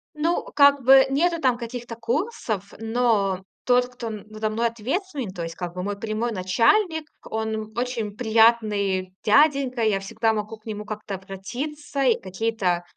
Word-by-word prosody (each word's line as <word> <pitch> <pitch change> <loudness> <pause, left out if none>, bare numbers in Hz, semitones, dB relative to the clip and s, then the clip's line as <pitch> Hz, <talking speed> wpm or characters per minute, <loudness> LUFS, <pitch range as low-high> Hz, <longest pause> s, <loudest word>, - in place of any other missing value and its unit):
Ну, 325 +3 0
как 280 -1 +6
бы 265 +1 +8
нету 335 +5 +1
там 255 -5 +2
каких-то 240 0 -6
курсов, 230 - -3
но 220 -5 +1 0.2
тот, 245 0 +4
кто 245 -2 -6
н 215 -2 -6
надо 215 0 -2
мной 230 +2 +1
ответственный, 265 - -3
то 175 -2 -6
есть, 165 0 -6
как 175 -1 -6
бы, 180 - -3
мой 200 +1 -3
прямой 225 +2 -2
начальник, 315 - +2 0.3
он, 220 0 -2
м, 220 0 -5
очень 240 -4 -2
приятный 215 -5 +2
дяденька. 275 +1 +3
Я 210 -3 +2
всегда 225 +3 0
могу 215 +1 -4
к 215 - -35
нему 210 -1 -5
как-то 210 -2 -5
обратиться 260 +10 -5
и 245 -4 +3
какие-то 190 -2 -1
225 Hz, 160 wpm, -24 LUFS, 205-255 Hz, 0.3 s, бы